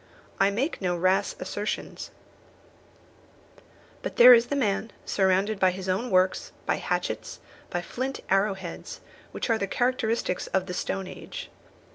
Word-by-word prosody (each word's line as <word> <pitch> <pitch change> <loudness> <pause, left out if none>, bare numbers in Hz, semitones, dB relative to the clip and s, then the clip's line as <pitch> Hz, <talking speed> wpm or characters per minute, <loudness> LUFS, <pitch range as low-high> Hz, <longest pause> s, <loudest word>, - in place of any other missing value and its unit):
I 195 - +5
make 245 +9 -2
no 180 -2 0
rash 185 +3 +2
assertions; 205 +1 -4 1.9
but - - -5
there 250 +1 +10
is 235 0 +5
the 285 - -1
man 220 -4 0 0.2
surrounded 195 +2 +1
by 185 - +5
his 185 +1 -5
own 195 +7 0
works, 185 0 +2
by - - +1
hatchets, - - -3 0.3
by 175 0 -2
flint 260 +8 -4
arrow 195 +1 +2
heads, 185 -3 -8 0.3
which - - -3
are 225 - +2
the 195 - -1
characteristics 230 -5 0
of 190 -1 0
the 180 - -5
stone 190 +1 -2
age. - - -8
195 Hz, 145 wpm, -27 LUFS, 185-230 Hz, 1.9 s, there